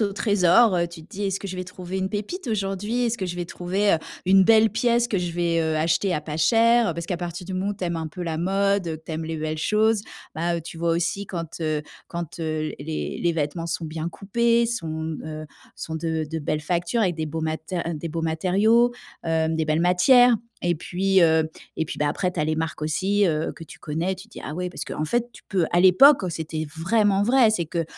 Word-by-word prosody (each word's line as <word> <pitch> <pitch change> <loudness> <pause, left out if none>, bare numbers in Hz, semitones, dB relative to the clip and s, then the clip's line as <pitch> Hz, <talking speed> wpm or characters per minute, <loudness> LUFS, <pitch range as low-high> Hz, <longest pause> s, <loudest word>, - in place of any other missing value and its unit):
aux 200 -2 +1
trésors, 200 0 +4
heu, 170 0 +1
tu 170 -1 -11
te 160 - -18
dis: 205 0 -5
«Est-ce 195 0 -2
que 200 - -6
je 185 - -5
vais 185 - -4
trouver 185 0 -6
une 190 0 -1
pépite 215 - -5
aujourd'hui? 210 +2 -1
Est-ce 235 +1 -1
que 190 - -2
je 175 - -4
vais 175 -1 -4
trouver, 190 +4 +1
heu, - - 0 0.3
une 190 0 +6
belle 220 +1 +5
pièce 240 0 +2
que 200 - 0
je 175 -1 -3
vais, 170 -1 +1
heu, 160 -1 0
acheter 165 +4 +1
à - - -1
pas 150 0 -6
cher?» 225 +4 +4
parce 170 +1 -5
qu'à 180 - -2
partir 175 0 -6
du 190 - -5
moment 190 +2 -1
où - - -8
tu 200 - -11
aimes 170 -1 -1
un 160 -1 -3
peu 175 +4 -7
la 165 -2 -3
mode, 195 +2 +1
que 165 - -3
tu 160 +1 -12
aimes 160 +1 -3
les 160 0 -4
belles 155 0 -3
choses, 215 +4 +2 0.3
bah, 170 +1 0
heu, - - -3
tu 165 0 -9
vois 170 0 +1
aussi 175 +4 -1
quand, 170 -3 -6
heu 155 -2 -1 0.2
quand, 170 -1 -6
heu, 155 -1 -2
les 155 +2 -4
les 170 - +2
vêtements 165 +1 -2
sont 165 0 -3
bien 160 +1 -4
coupés, 235 +6 +1
sont, 160 -8 -3
heu, 155 0 -6 0.3
sont 160 - -5
de 160 -1 -2
de 160 - -2
belles 155 0 -2
factures, 175 +7 -1
avec 180 -6 +1
des 160 -1 -2
beaux 160 +2 -4
mater 160 +3 -3 0.2
des 165 +3 -5
beaux 165 +1 -4
matériaux, 200 +9 +3 0.3
heu, 160 -1 +1
des 160 0 0
belles 155 +1 +1
matières. 235 +8 +5 0.2
Et 175 0 +1
puis, 190 +3 +1
heu, 160 -1 +4 0.3
et 160 - 0
puis, - - -7
bah, 150 - +1
après 180 +4 -1
tu 175 - -3
as - - +1
les 155 0 -1
marques 160 -1 -3
aussi, 195 +7 +1
heu, 155 -2 -1
que 165 - -12
tu - - -13
connais. 165 +5 -2
Tu 190 +4 -12
dis: - - -11
«Ah 150 - -5
ouais!» 180 +2 -3
parce - - -5
qu'en 155 - -3
fait, 240 +9 0
tu - - -15
peux 185 -5 +1
à 175 - +4
l'époque, 200 +10 +7
c'était 160 -1 -4
vraiment 200 +3 +2
vrai, 240 +1 +5
c'est 180 -6 0
que, 165 +1 -2
175 Hz, 245 wpm, -24 LUFS, 160-200 Hz, 0.3 s, l'époque